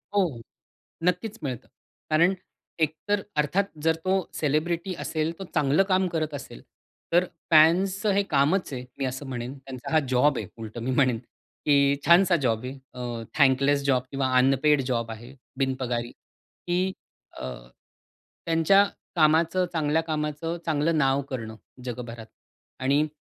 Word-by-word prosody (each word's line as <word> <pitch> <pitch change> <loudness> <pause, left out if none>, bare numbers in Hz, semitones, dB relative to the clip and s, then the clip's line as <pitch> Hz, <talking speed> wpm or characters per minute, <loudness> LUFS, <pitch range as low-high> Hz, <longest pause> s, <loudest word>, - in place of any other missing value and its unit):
हो, 200 - +5
हो, 145 -11 -2 0.6
नक्कीच 215 +4 0
मिळतं. 130 -5 -4 0.4
कारण 165 +4 +4 0.5
एकतर 160 +6 0 0.2
अर्थात 150 +7 +2 0.2
जर 160 0 +3
तो 190 +1 +2
सेलिब्रिटी 170 +5 -1
असेल, 155 0 -1
तो 195 - -4
चांगलं 150 +4 +3
काम 185 0 +3
करत 155 -2 -1
असेल 135 - -8 0.5
तर 175 +1 +5 0.3
फॅन्सचं 185 +6 +5
हे 200 +1 +2
कामच 155 +2 +1
आहे 125 -1 -5
मी 135 - 0
असं 130 +2 -4
म्हणेन, 125 0 -5
त्यांचा 130 -2 -8
हा 160 - +6
जॉब 130 +2 +3
आहे - - -4
उलटं 115 +1 -7
मी 130 - -1
म्हणेन 130 -3 +3 0.5
की 140 -1 +4
छानसा 175 +1 +6
जॉब 115 -1 +1
आहे, 130 - -5 0.2
अ, 120 -2 -5 0.2
थँकलेस 140 +1 +4
जॉब 130 -3 +2
किंवा 135 -1 0
अनपेड 135 +2 +4
जॉब 115 -2 -1
आहे, 120 +4 -10 0.2
बिनपगारी 130 -3 -1
की 180 +2 -4 0.5
अ, 65 - -4 1.0
त्यांच्या 165 +4 +5 0.3
कामाचं 165 +3 +3
चांगल्या 160 -1 +1
कामाचं 155 +1 -3
चांगलं 160 +1 +1
नाव 135 -1 +2
करणं 110 -4 -5 0.3
जगभरात 120 -2 -6 0.5
आणि 140 +4 +2
150 Hz, 140 wpm, -26 LUFS, 130-170 Hz, 1.0 s, हा